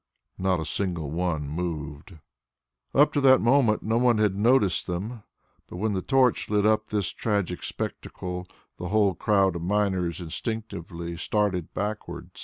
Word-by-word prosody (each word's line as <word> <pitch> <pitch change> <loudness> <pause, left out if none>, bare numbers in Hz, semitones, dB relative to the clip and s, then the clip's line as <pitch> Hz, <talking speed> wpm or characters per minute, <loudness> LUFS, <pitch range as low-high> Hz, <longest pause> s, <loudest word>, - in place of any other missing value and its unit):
Not 95 -2 +1
a 80 - -3
single 85 -7 -2
one 80 -3 -1
moved. 80 0 -5 0.8
Up 145 +2 +5
to 145 - +1
that 130 -1 +7
moment 120 -3 +3
no 110 +2 +1
one 120 -2 +4
had 105 -3 +2
noticed 105 -4 +3
them, 105 +6 -4 0.5
but - - -10
when 105 +3 0
the 95 - -1
torch 130 -1 +2
lit 105 -1 +2
up 110 0 +2
this 100 -5 -1
tragic 100 -5 -1
spectacle 90 0 -5 0.3
the 90 - -4
whole 100 0 +3
crowd 95 -1 +2
of 85 - -4
miners 95 -3 0
instinctively 85 -2 -5
started 95 -2 -1
backward. 105 +2 -4
100 Hz, 150 wpm, -26 LUFS, 85-110 Hz, 0.8 s, that